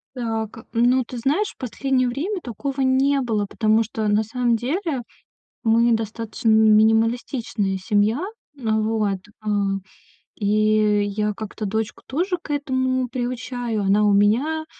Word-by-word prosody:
Так, 225 Hz, -2 st, -4 dB
ну 245 Hz, +3 st, +3 dB
ты 250 Hz, -, -8 dB
знаешь, 295 Hz, -, +1 dB
в -, -, -45 dB
последнее 255 Hz, +1 st, 0 dB
время 325 Hz, -, -2 dB
такого 270 Hz, +3 st, -4 dB
не 270 Hz, +2 st, +3 dB
было, 220 Hz, -5 st, 0 dB
потому 220 Hz, +2 st, +2 dB
что 220 Hz, 0 st, -3 dB
на 210 Hz, +1 st, +3 dB
самом 240 Hz, +2 st, 0 dB
деле 275 Hz, -, -2 dB, 0.6 s
мы 230 Hz, +1 st, +4 dB
достаточно 225 Hz, 0 st, -2 dB
минималистичная 220 Hz, -1 st, +3 dB
семья. 205 Hz, +5 st, +1 dB, 0.4 s
Вот, 220 Hz, -4 st, 0 dB, 0.3 s
э, -, -, -5 dB, 0.9 s
и 215 Hz, 0 st, +2 dB
я 210 Hz, +1 st, -1 dB
как-то 215 Hz, +1 st, -6 dB
дочку 220 Hz, +1 st, -3 dB
тоже 355 Hz, +6 st, -1 dB
к -, -, -8 dB
этому 260 Hz, -3 st, 0 dB
приучаю. 245 Hz, -2 st, -3 dB
Она 200 Hz, +2 st, +3 dB
у 205 Hz, -1 st, +4 dB
меня, 250 Hz, +11 st, +2 dB
230 Hz, 130 wpm, -22 LUFS, 215-260 Hz, 0.9 s, мы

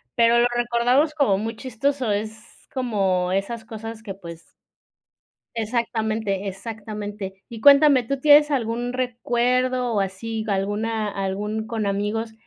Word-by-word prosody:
Pero 235 Hz, 0 st, +5 dB
lo 240 Hz, -, +5 dB
recordamos 240 Hz, +5 st, +2 dB
como 270 Hz, -11 st, +2 dB
muy 225 Hz, +2 st, -3 dB
chistoso, 260 Hz, 0 st, -1 dB
es 220 Hz, +2 st, -6 dB
como 195 Hz, -8 st, 0 dB
esas 220 Hz, +4 st, -2 dB
cosas 225 Hz, 0 st, -8 dB
que, 195 Hz, -3 st, -7 dB
pues 170 Hz, -3 st, -11 dB, 1.1 s
Exactamente, 220 Hz, -3 st, -1 dB
exactamente. 205 Hz, -1 st, -6 dB
Y 230 Hz, -2 st, -9 dB
cuéntame, 280 Hz, -1 st, +7 dB
¿tú 275 Hz, +3 st, -3 dB
tienes 295 Hz, +1 st, +6 dB
algún 240 Hz, -2 st, -1 dB
recuerdo 250 Hz, 0 st, 0 dB
o 205 Hz, -, +2 dB
así, 215 Hz, +4 st, -3 dB
alguna 210 Hz, +2 st, -1 dB
algún 205 Hz, +2 st, -3 dB
con 220 Hz, -2 st, -2 dB
amigos 210 Hz, +3 st, -2 dB
225 Hz, 125 wpm, -23 LUFS, 205-245 Hz, 1.1 s, cuéntame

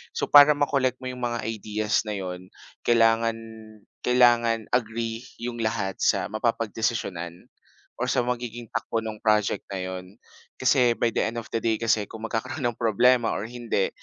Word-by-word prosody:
So, -, -, -2 dB
para 145 Hz, +1 st, +9 dB
ma-collect 135 Hz, -3 st, +1 dB
mo -, -, -4 dB
yung 125 Hz, -, -7 dB
mga 120 Hz, -1 st, -2 dB
ideas 110 Hz, 0 st, -1 dB
na 105 Hz, -, -2 dB
'yon, 90 Hz, -1 st, -6 dB, 0.4 s
kailangan, 115 Hz, -1 st, +3 dB, 0.7 s
kailangan 120 Hz, -3 st, +3 dB
agree 115 Hz, -1 st, -1 dB, 0.2 s
yung 120 Hz, 0 st, -4 dB
lahat 110 Hz, -4 st, -2 dB
sa -, -, +1 dB
mapapagdesisyonan 110 Hz, -6 st, -2 dB, 0.5 s
or 125 Hz, -, 0 dB
sa 130 Hz, -1 st, +2 dB
magiging 120 Hz, -1 st, -4 dB
takbo 115 Hz, -1 st, -2 dB
no'ng 110 Hz, -1 st, -5 dB
project 105 Hz, -1 st, +2 dB
na 95 Hz, -, -3 dB
'yon. 95 Hz, +1 st, -7 dB, 0.5 s
Kasi, 125 Hz, -2 st, +4 dB
by 120 Hz, -, +1 dB
the -, -, 0 dB
end 115 Hz, -, -5 dB
of 110 Hz, -, -15 dB
the 115 Hz, -, 0 dB
day, 115 Hz, -1 st, +1 dB
kasi 110 Hz, -2 st, +2 dB
kung 110 Hz, 0 st, -10 dB
magkakaroon 130 Hz, +6 st, -3 dB
ng 120 Hz, -1 st, -4 dB
problema 120 Hz, +1 st, +3 dB
or 110 Hz, +4 st, -4 dB
hindi, 120 Hz, -5 st, -1 dB
115 Hz, 165 wpm, -25 LUFS, 110-120 Hz, 0.7 s, para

